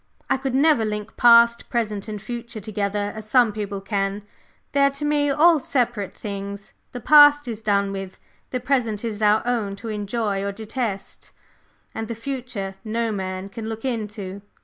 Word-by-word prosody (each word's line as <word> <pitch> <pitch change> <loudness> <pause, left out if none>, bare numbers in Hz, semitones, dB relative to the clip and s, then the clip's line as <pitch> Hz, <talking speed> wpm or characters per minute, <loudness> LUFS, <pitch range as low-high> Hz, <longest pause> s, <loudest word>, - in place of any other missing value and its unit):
I 265 - +4
could 265 -1 -3
never 290 -3 +4
link 210 0 -4
past, 235 0 +5
present 215 -4 -2
and 210 -1 -5
future 235 +1 -6
together 205 0 -2
as 215 0 -8
some 245 -2 +5
people 205 -2 -4
can; 195 0 -2 0.5
they 280 - +2
are 280 - +6
to 280 +2 -5
me 295 -1 +2
all 315 +3 +5
separate 240 -7 -1
things. 200 0 -6 0.2
The 245 - -6
past 290 +1 +7
is 225 -2 -5
done 200 -2 +1
with, 195 -1 -6 0.3
the 255 - -2
present 245 -4 0
is 220 -2 -4
our 210 +1 +4
own 225 -5 -1
to 225 +3 -7
enjoy 210 -1 -2
or 200 0 -3
to 220 +2 -8
detest, 215 -4 -4 0.6
and 225 0 -4
the 230 - -4
future 230 -6 -5
no 230 +1 -1
man 190 -1 -4
can 220 +2 -7
look 225 +2 -6
into." 210 -5 -4
220 Hz, 175 wpm, -23 LUFS, 200-245 Hz, 0.6 s, past